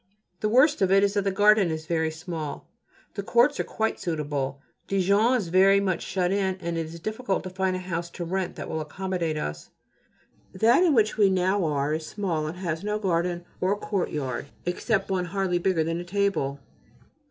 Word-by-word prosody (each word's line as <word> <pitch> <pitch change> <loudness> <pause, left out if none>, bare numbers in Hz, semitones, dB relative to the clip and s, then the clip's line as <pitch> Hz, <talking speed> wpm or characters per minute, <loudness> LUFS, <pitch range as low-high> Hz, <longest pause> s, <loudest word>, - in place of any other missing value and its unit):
The 215 - 0
worst 270 +5 +4
of 190 -1 +3
it 195 +1 +5
is 200 0 +2
that 200 -1 0
the 195 - +2
garden 205 -1 +4
is 160 0 -4
very 160 -1 0
small: 160 -2 -6 0.5
the 200 - -3
courts 240 +8 +3
are - - +2
quite 220 0 -2
suitable. 145 -4 -2 0.3
Dijon 200 +5 +3
is 195 -8 -4
very 195 +3 +5
much 190 -3 0
shut 185 -1 -1
in, 195 -1 +1
and 170 -2 -4
it 165 -1 -2
is 165 +1 -9
difficult 215 +2 -2
to 185 - -6
find 190 0 0
a - - -3
house 170 -2 -4
to 175 - -3
rent 185 +1 -2
that - - -6
will 160 - -3
accommodate 170 0 -3
us. 75 - -5 0.8
That 225 - +4
in 325 -6 +4
which 215 -2 +2
we 205 -2 +5
now 190 +1 +1
are 145 -1 0
is 155 0 -3
small 170 -7 -2
and 165 +3 -6
has 170 -2 -3
no 210 0 -1
garden 175 -3 -1 0.2
or 195 +3 +1
courtyard 150 - -3 0.2
except 195 +3 -1
one 185 -2 0
hardly 185 -1 -1
bigger 175 -2 +1
than 165 +1 -2
a - - -4
table. 180 -7 -1
185 Hz, 200 wpm, -26 LUFS, 165-200 Hz, 0.8 s, it